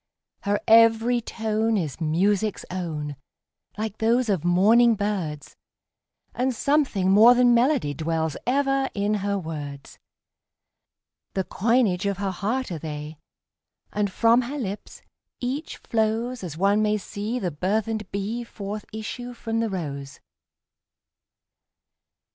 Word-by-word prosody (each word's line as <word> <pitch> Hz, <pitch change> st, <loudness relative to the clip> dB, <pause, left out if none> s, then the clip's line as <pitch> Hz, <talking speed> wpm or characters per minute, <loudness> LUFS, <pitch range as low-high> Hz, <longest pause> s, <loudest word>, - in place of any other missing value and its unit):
Her 205 Hz, +1 st, 0 dB
every 230 Hz, +2 st, +5 dB
tone 220 Hz, 0 st, -1 dB
is 165 Hz, -3 st, -3 dB
music's 195 Hz, +6 st, +1 dB
own, 155 Hz, -6 st, -4 dB, 0.6 s
like 215 Hz, 0 st, -4 dB
those 235 Hz, +2 st, +2 dB
of 190 Hz, -6 st, +1 dB
morning 220 Hz, +7 st, +5 dB
birds, 190 Hz, -8 st, -3 dB, 0.8 s
And 250 Hz, 0 st, 0 dB
something 260 Hz, -9 st, +1 dB
more 225 Hz, +5 st, +8 dB
than 245 Hz, -1 st, +5 dB
melody 240 Hz, -, +2 dB
dwells 160 Hz, +1 st, -2 dB
ever 270 Hz, +1 st, +1 dB
in 205 Hz, +1 st, 0 dB
her 200 Hz, 0 st, 0 dB
words; 145 Hz, -5 st, -7 dB, 1.4 s
The 190 Hz, -, +1 dB
coinage 210 Hz, -3 st, +1 dB
of 200 Hz, -2 st, -1 dB
her 200 Hz, -1 st, -2 dB
heart 215 Hz, +6 st, -2 dB
are 165 Hz, -, -4 dB
they, 150 Hz, 0 st, -7 dB, 0.7 s
and 205 Hz, -1 st, 0 dB
from 230 Hz, +4 st, +4 dB
her 260 Hz, +4 st, -5 dB
lips 210 Hz, -6 st, -6 dB, 0.4 s
each 265 Hz, +5 st, -4 dB
flowsAs 220 Hz, -5 st, -1 dB
one 200 Hz, +3 st, +3 dB
may 215 Hz, 0 st, +2 dB
see 210 Hz, +4 st, -4 dB
the 185 Hz, -8 st, -2 dB
burthened 210 Hz, +5 st, -2 dB
bee 205 Hz, +5 st, -3 dB
forth 210 Hz, -2 st, -6 dB
issue 245 Hz, +3 st, -6 dB
from 225 Hz, -1 st, -3 dB
the 230 Hz, -1 st, 0 dB
rose. 140 Hz, -7 st, -5 dB
210 Hz, 120 wpm, -25 LUFS, 180-235 Hz, 1.4 s, more